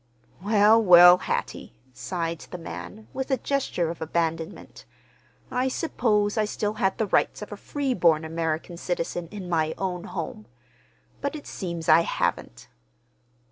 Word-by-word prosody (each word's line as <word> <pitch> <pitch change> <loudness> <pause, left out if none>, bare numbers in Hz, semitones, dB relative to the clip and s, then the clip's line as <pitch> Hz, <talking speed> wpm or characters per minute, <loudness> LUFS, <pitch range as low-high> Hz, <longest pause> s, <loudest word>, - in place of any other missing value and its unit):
"Well, 210 +2 +5
well, 180 -1 +9
Hattie," - - -4 0.2
sighed 170 -1 -4
the 180 - -6
man, 210 +5 -9
with 265 0 -4
a 265 - +2
gesture 230 - -1
of 170 - -10
abandonment. 165 0 -3 0.7
"I 255 +1 0
supposed 220 -7 0
I 215 - +2
still 210 0 -2
had 195 -3 0
the 220 - 0
rights 205 - +1
of 210 - -10
a - - -5
freeborn 190 - +1
American 165 +1 -3
citizen 175 -1 -3
in 195 0 -8
my 160 -2 0
own 180 -2 -3
home; 155 - -6 0.7
but 280 +2 -2
it 295 - -8
seems 170 -3 -5
I 160 0 +7
haven't." 60 - -2
180 Hz, 140 wpm, -25 LUFS, 165-215 Hz, 0.7 s, well